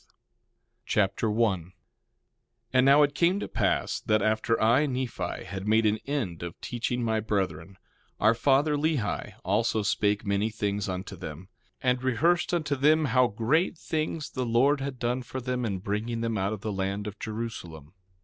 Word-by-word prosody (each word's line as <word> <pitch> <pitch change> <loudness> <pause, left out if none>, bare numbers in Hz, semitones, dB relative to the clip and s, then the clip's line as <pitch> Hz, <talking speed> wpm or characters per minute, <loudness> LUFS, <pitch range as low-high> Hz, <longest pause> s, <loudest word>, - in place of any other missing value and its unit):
2 - - -32
Nephi - - -36 0.7
Chapter 105 +2 +1
1 105 -4 +2
1:1 85 +3 -16 1.0
And 130 0 +5
now 145 +2 +7
it 145 0 +1
came 175 +5 +2
to - - -4
pass - - 0
that 110 -1 +1
after 110 +1 +1
I, 120 +7 +4
Nephi, 125 -9 -3
had 95 0 -6
made 110 +1 +4
an 105 +1 +2
end 115 - -2
of 85 -1 -7
teaching 120 0 -2
my 110 -1 +1
brethren, 100 -2 -2 0.4
our 110 +2 +5
father, 140 +5 +3
Lehi, 145 -7 -1
also 110 +3 +1
spake 105 +1 +1
many 100 +2 +1
things 105 -2 -2
unto 95 +1 -5
them, 85 +1 -8 0.3
and 125 -1 +2
rehearsed 165 +8 +2
unto 155 -5 0
them, 155 +3 +4
how 130 -1 +4
great 125 - +1
things 155 -1 -3
the 130 - -2
Lord 130 +5 +3
had 135 -1 -4
done 125 +1 -1
for 130 +1 -6
them 125 -1 -2
in 100 -4 -1
bringing 110 +5 -3
them 115 -1 -1
out 100 0 0
of 105 - -6
the 105 -1 -3
land 95 +1 -2
of 105 -1 -7
Jerusalem. 100 -9 -6
115 Hz, 180 wpm, -27 LUFS, 100-130 Hz, 1.0 s, now